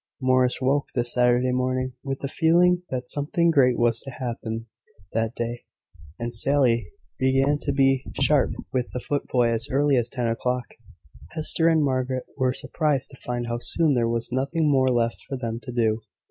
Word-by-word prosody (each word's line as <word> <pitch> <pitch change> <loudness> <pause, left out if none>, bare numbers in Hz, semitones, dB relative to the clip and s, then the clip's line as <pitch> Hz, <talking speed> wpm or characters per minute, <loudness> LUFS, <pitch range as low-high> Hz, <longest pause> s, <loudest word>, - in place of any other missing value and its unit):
Morris 130 -1 +2
woke, 135 +2 +1
this 120 -1 +4
Saturday 125 +1 +3
morning, 130 0 -1
with 135 -1 -4
the 140 - -2
feeling 175 +4 +3
that 125 -1 -4
something 160 +5 +1
great 125 -5 +4
was 115 -1 +2
to 135 - -6
happen 115 -3 -5 0.5
that 115 +1 -1
day; 120 0 -4 0.5
and 120 0 -4
Sally 120 -3 +2 0.3
began 135 +2 +2
to 140 - -1
be 135 -1 +2 0.2
sharp 140 0 +3 0.2
with 125 -2 -1
the 125 - -2
footboy 125 -3 0
as 115 +2 -1
early 140 0 +2
as 120 -1 +1
ten 120 -2 -2
o'clock. 125 +1 -2 0.6
Hester 160 +1 +2
and 160 -2 +4
Margaret 130 -2 -1
were 130 -2 +1
surprised 140 +1 -1
to 135 - -13
find 120 -1 -3
how 120 0 -3
soon 155 +4 +1
there 120 -2 +1
was 115 +1 -2
nothing 140 +4 0
more 130 -2 +3
left 115 -2 0
for 135 - -3
them 115 -2 -4
to 120 +2 -8
do. 115 -2 +1
130 Hz, 175 wpm, -24 LUFS, 120-140 Hz, 0.6 s, this